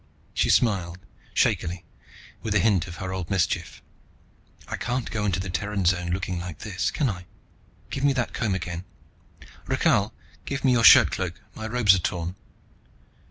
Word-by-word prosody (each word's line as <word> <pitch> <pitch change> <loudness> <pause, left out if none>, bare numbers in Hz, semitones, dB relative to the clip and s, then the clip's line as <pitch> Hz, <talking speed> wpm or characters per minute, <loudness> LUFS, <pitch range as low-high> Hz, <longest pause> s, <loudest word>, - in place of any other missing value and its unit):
She - - +1
smiled, 90 -7 +2 0.3
shakily, 85 +1 0 0.6
with 105 -2 -2
a - - +5
hint 95 -4 +2
of 85 - -8
her 95 0 -5
old 90 -3 -4
mischief. 95 -5 -1 0.8
"I - - -3
can't 125 0 -3
go 105 -2 -1
into 95 -4 0
the 95 0 -4
Terran 100 0 -2
Zone 90 0 +2
looking 90 0 -2
like 85 -4 -6
this, 95 0 -2
can 150 - 0
I? 90 -5 -5 0.6
Give 135 - -3
me 145 - +5
that 125 -3 -2
comb 105 -5 0
again. 85 -1 -4 0.8
Rakhal, - - +2 0.3
give 140 0 -3
me 130 - +5
your 120 -2 +3
shirtcloak, 90 -5 +6 0.2
my 110 - -6
robes 115 -4 +4
are 95 - +2
torn." 85 0 -2
95 Hz, 160 wpm, -25 LUFS, 90-110 Hz, 0.8 s, shirtcloak